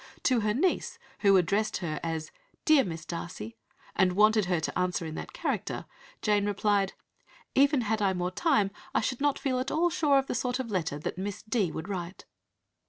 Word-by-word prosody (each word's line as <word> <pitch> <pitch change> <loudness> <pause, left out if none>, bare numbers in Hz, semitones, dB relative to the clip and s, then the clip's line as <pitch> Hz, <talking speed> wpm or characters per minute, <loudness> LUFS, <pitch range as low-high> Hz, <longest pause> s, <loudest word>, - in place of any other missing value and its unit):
To 255 -3 +3
her 210 -1 0
niece 355 +7 0 0.2
who 195 -2 +5
addressed 200 +5 +1
her 155 -4 -3
as 160 -1 -3 0.3
"Dear 305 -3 +6
Miss 165 -3 -6
Darcy," 165 -9 -6 0.4
and 185 -1 +3
wanted 215 +1 +4
her 175 -2 +1
to 160 - -3
answer 180 -2 0
in 160 - -5
that - - -6
character, - - -3 0.4
Jane 205 -1 +2
replied 205 -1 +1 0.6
"Even 280 0 +4
had 220 -1 0
I 195 -2 +3
more 180 0 -2
time 205 - +2 0.2
I - - +4
should 250 +3 -2
not 290 -1 +2
feel 255 -2 -1
at 260 +2 -2
all 340 +3 +2
sure 300 -5 +3
of 270 - +2
the - - -3
sort 250 0 -1
of 255 -4 -4
letter 165 -7 -1
that 155 +4 -5
Miss 200 +1 -4
D. 215 -6 0
would 160 +3 -5
write." 185 -2 -5
205 Hz, 195 wpm, -29 LUFS, 180-250 Hz, 0.6 s, Dear